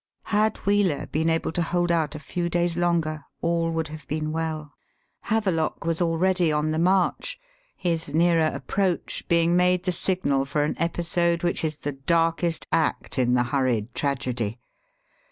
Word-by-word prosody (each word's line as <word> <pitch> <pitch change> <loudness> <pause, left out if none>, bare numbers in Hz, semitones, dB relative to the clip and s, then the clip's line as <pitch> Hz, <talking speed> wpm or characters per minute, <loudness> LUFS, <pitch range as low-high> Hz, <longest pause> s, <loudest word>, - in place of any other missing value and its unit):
Had 215 +1 +3
Wheeler 200 -6 +2
been 160 +2 0
able 165 0 0
to 175 - -1
hold 175 +1 0
out 160 -3 +1
a - - -5
few 170 +3 -3
days 175 0 +1
longer 165 -3 0 0.2
all 170 0 0
would 165 -2 -2
have 155 -2 -10
been 155 0 -2
well. 155 -2 -3 0.6
Have 220 -1 +2
lock 165 -3 -1
was 165 +1 0
already 175 0 +2
on 150 +1 0
the 155 - 0
march, 190 - +1 0.4
his 165 -4 -1
nearer 165 0 +3
approach 190 +2 -1
being 170 0 +3
made 180 0 +3
the 185 - 0
signal 170 -7 0
for 145 +2 0
an 150 - 0
episode 170 0 0
which 175 -1 0
is 155 -2 -1
the 145 - -3
darkest 165 +4 0
act 155 -3 0
in 125 0 +3
the 120 - +3
hurried 120 -3 0
tragedy. 125 -5 -2
165 Hz, 165 wpm, -25 LUFS, 150-175 Hz, 0.6 s, Had